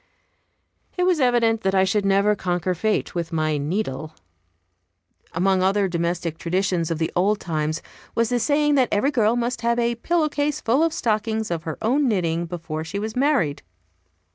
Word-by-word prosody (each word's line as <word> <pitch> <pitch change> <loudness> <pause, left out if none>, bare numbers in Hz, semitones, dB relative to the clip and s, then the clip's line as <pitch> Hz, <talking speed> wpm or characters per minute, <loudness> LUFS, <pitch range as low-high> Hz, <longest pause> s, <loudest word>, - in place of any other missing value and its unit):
It 360 - +1
was 360 -3 +2
evident 235 -3 +2
that 195 -1 0
I 190 - +5
should 200 +1 +1
never 200 +2 +3
conquer 180 -1 -1
fate 215 +5 -1
with 170 -2 -3
my 155 -2 0
needle. 155 -1 -3 1.2
Among 185 +2 +1
other 195 +1 +2
domestic 170 -2 -2
traditions 180 -1 0
of 165 - -1
the 160 0 -1
old 200 +4 +2
times 155 -1 -2 0.3
was 230 -1 +2
the 245 - +1
saying 295 +3 +2
that 260 -4 +3
every 270 +8 +2
girl 230 -4 +2
must 240 -1 -2
have 235 0 +1
a 235 0 +1
pillow 310 +7 0
case 290 0 -1
full 250 +5 +1
of 330 - +2
stockings 220 - -1
of 165 -1 -3
her 160 - -4
own 270 +6 +2
knitting 170 -6 0
before 165 -2 -5
she 165 +5 -5
was 220 +2 -4
married. 255 - +1
200 Hz, 175 wpm, -23 LUFS, 170-240 Hz, 1.2 s, I